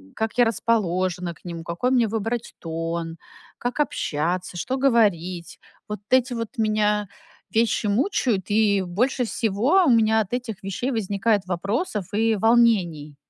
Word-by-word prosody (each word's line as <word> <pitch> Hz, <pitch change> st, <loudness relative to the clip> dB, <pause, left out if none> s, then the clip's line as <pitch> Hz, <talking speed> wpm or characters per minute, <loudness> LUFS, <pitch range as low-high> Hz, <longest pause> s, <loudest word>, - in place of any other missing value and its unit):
как 220 Hz, +2 st, -3 dB
я 245 Hz, -, +6 dB
расположена 185 Hz, -5 st, 0 dB
к -, -, -24 dB
нему, 170 Hz, -1 st, -6 dB
какой 175 Hz, +10 st, -1 dB
мне 245 Hz, -3 st, +3 dB
выбрать 225 Hz, +2 st, -3 dB
тон, 165 Hz, 0 st, -4 dB, 0.4 s
как 245 Hz, +4 st, -4 dB
общаться, 175 Hz, -, -2 dB
что 260 Hz, +10 st, -2 dB
говорить. 190 Hz, -10 st, +1 dB, 0.3 s
Вот 210 Hz, -, -4 dB
эти 255 Hz, 0 st, +3 dB
вот 230 Hz, +2 st, -5 dB
меня 210 Hz, -2 st, +1 dB, 0.4 s
вещи 225 Hz, -1 st, +1 dB
мучают, 220 Hz, -, +1 dB
и 205 Hz, -2 st, +3 dB
больше 240 Hz, +8 st, 0 dB
всего 235 Hz, -, +2 dB
у 285 Hz, -, +3 dB
меня 220 Hz, -1 st, +4 dB
от 200 Hz, -, -6 dB
этих 240 Hz, -6 st, -4 dB
вещей 195 Hz, +7 st, -3 dB
возникает 205 Hz, -2 st, 0 dB
вопросов 200 Hz, -, -2 dB
и 225 Hz, +1 st, +2 dB
волнений. 190 Hz, -10 st, +2 dB
210 Hz, 140 wpm, -23 LUFS, 180-235 Hz, 0.4 s, я